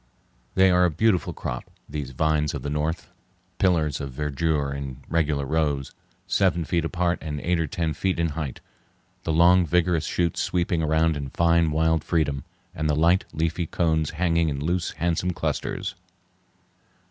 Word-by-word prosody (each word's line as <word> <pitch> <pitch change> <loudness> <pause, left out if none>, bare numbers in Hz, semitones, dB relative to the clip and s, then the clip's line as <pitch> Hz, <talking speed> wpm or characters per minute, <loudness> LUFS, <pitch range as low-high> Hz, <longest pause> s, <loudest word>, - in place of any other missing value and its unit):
They 95 0 +5
are 90 0 +4
a 90 - +4
beautiful 95 +3 +1
crop, - - -5 0.2
these 75 -2 -5
vines 75 +2 0
of - - -5
the 70 - -3
north, 75 +2 -2 0.5
pillars 80 -6 +2
of 70 - -4
verdure 75 +1 -1
in 70 -2 -5
regular 75 -4 0
rows, 75 -2 0 0.3
seven 90 -4 +1
feet 85 +2 0
apart 85 +1 0
and 75 -2 -4
eight 85 0 +1
or 80 - 0
ten 80 +1 -2
feet 95 +2 -1
in 85 0 +1
height; 75 -4 -5 0.6
the 80 - 0
long, 90 +3 +5
vigorous 85 -1 +1
shoots 85 -2 0
sweeping 85 -2 0
round 80 +1 +2
in 70 -2 -4
fine, 85 +1 +3
wild 80 +1 +2
freedom, 70 -5 0 0.3
and 75 0 -2
the 75 - +2
light, 85 +5 +3
leafy 80 +2 -1
cones 80 -3 +1
hanging 85 -2 +2
in 70 -2 -3
loose, 85 +4 -1
handsome 85 +2 -1
clusters. - - -3
80 Hz, 160 wpm, -25 LUFS, 75-85 Hz, 0.6 s, They